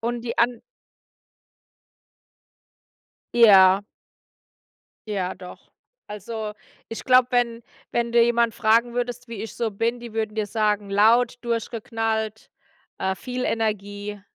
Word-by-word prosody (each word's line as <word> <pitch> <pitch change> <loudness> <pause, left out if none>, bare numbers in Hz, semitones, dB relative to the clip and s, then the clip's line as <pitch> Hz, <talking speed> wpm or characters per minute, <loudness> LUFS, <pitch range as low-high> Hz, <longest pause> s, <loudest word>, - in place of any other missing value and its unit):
Und 235 +1 -3
die 230 -1 -5
An 240 0 +1 2.7
Ja. 195 -4 +7 1.3
Ja, 190 -3 -2
doch. 180 -1 -13 0.4
Also, 210 +1 -6 0.4
ich 225 - -7
glaube, 255 -1 +5
wenn 240 -1 0 0.3
wenn 235 0 -1
du 235 - +5
jemanden 235 -1 +2
fragen 235 +1 +2
würdest, 245 0 -4
wie 220 -3 -6
ich 225 - -7
so 230 -2 -1
bin, 230 +4 -1
die 235 -2 -9
würden 220 -1 -3
dir 215 -1 -1
sagen: 210 -1 -1
„Laut, 230 +5 +4
durchgeknallt, 225 -2 -3 0.5
äh, 190 0 -1
viel 250 0 -4
Energie“, 205 -2 -3
225 Hz, 115 wpm, -23 LUFS, 210-235 Hz, 2.7 s, Ja